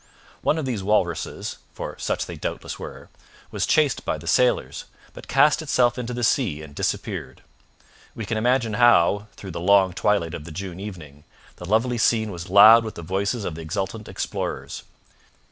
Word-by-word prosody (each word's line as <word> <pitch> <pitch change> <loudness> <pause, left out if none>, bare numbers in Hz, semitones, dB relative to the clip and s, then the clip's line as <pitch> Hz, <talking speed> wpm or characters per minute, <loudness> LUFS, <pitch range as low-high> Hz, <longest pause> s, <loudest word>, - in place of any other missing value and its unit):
One 155 - +1
of 155 - -2
these 120 -6 -2
walruses, 95 -5 -1 0.2
for - - -6
such - - -2
they - - -8
doubtless - - -5
were, - - -9 0.4
was - - -1
chased 150 -4 +2
by - - -2
the 80 - -12
sailors, 125 +8 +1 0.3
but - - -12
cast 150 +3 +4
itself 125 -5 +2
into 125 0 -4
the 120 0 -4
sea 100 - +1
and 75 -2 -12
disappeared. 65 -2 -4 0.7
We 115 - -5
can 110 - -2
imagine 120 0 +1
how, 105 -2 +4
through 95 - -9
the 85 - -5
long 95 0 +4
twilight 95 -4 0
of 75 - -6
the 85 - -10
June 90 +2 -6
evening, 80 -8 -9 0.3
the 90 - -8
lovely 115 +3 +1
scene 110 -1 +2
was 85 -1 -8
loud 110 +4 +8
with 110 - -6
the 85 - -8
voices 100 +5 -2
of 85 - -3
the 80 - -8
exultant 95 +6 -4
explorers. - - -4
100 Hz, 180 wpm, -23 LUFS, 85-120 Hz, 0.7 s, loud